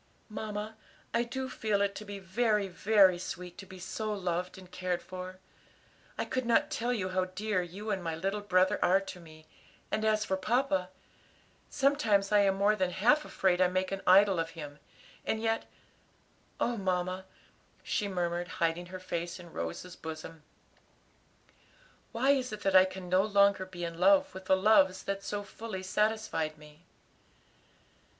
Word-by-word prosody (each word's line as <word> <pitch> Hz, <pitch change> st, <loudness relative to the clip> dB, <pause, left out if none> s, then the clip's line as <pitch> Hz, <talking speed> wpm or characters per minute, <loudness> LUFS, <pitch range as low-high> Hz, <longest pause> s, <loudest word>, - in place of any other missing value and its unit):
"Mamma, 215 Hz, 0 st, -5 dB, 0.4 s
I 235 Hz, -, +3 dB
do 260 Hz, +2 st, -4 dB
feel 215 Hz, -5 st, -1 dB
it 200 Hz, 0 st, +1 dB
to 215 Hz, -, -8 dB
be 205 Hz, -1 st, -6 dB
very, 210 Hz, +2 st, +1 dB
very 190 Hz, -1 st, +4 dB
sweet 180 Hz, -1 st, -6 dB
to 195 Hz, -, -9 dB
be 185 Hz, -, -11 dB
so 215 Hz, +4 st, -4 dB
loved 180 Hz, -3 st, -2 dB
and 185 Hz, -1 st, -13 dB
cared 180 Hz, -1 st, -2 dB
for. 185 Hz, 0 st, -8 dB, 0.8 s
I -, -, -1 dB
could 255 Hz, -, -2 dB
not 290 Hz, +6 st, +3 dB
tell 245 Hz, -4 st, -1 dB
you 200 Hz, -6 st, -1 dB
how 185 Hz, 0 st, 0 dB
dear 185 Hz, +1 st, -1 dB
you 195 Hz, +5 st, -6 dB
and 190 Hz, -3 st, -2 dB
my 165 Hz, -1 st, -2 dB
little 195 Hz, +5 st, -2 dB
brother 185 Hz, -2 st, +2 dB
are 190 Hz, +2 st, +5 dB
to 195 Hz, -2 st, -8 dB
me, 155 Hz, -2 st, -15 dB, 0.5 s
and 215 Hz, -, 0 dB
as 215 Hz, -1 st, +2 dB
for 190 Hz, -, 0 dB
papa 195 Hz, -3 st, +1 dB, 0.8 s
sometimes 250 Hz, -9 st, +2 dB
I 210 Hz, -, +6 dB
am 195 Hz, -1 st, +3 dB
more 200 Hz, +2 st, +3 dB
than 185 Hz, -3 st, 0 dB
half 245 Hz, +12 st, +3 dB
afraid 185 Hz, -1 st, +1 dB
I 185 Hz, -, +6 dB
make 185 Hz, +1 st, -1 dB
an 195 Hz, -, -3 dB
idol 195 Hz, -1 st, +6 dB
of 165 Hz, 0 st, -1 dB
him; 145 Hz, -2 st, -8 dB, 0.4 s
and 220 Hz, -, -1 dB
yet 225 Hz, 0 st, -1 dB, 0.9 s
oh, 240 Hz, 0 st, 0 dB
mamma," 185 Hz, -1 st, -1 dB, 0.6 s
she 205 Hz, -, -1 dB
murmured, 175 Hz, -2 st, -2 dB
hiding 170 Hz, +1 st, 0 dB
her 185 Hz, +1 st, -7 dB
face 175 Hz, -1 st, -4 dB
in 175 Hz, -2 st, -12 dB
Rose's 85 Hz, -, -5 dB
bosom, 160 Hz, 0 st, -8 dB, 1.7 s
"why 250 Hz, +4 st, +3 dB
is 260 Hz, -2 st, 0 dB
it 215 Hz, 0 st, -6 dB
that 195 Hz, -1 st, +1 dB
I 185 Hz, 0 st, +9 dB
can 185 Hz, -1 st, -7 dB
no 185 Hz, +1 st, +4 dB
longer 200 Hz, -2 st, +3 dB
be 180 Hz, -2 st, -7 dB
in 170 Hz, 0 st, -6 dB
love 285 Hz, +7 st, +4 dB
with 190 Hz, 0 st, -9 dB
the 190 Hz, -, +4 dB
loves 190 Hz, -2 st, +4 dB
that 195 Hz, 0 st, -3 dB
so 205 Hz, 0 st, -3 dB
fully 205 Hz, -2 st, -7 dB
satisfied 185 Hz, -6 st, 0 dB
me?" 150 Hz, +2 st, -17 dB
190 Hz, 170 wpm, -31 LUFS, 180-215 Hz, 1.7 s, I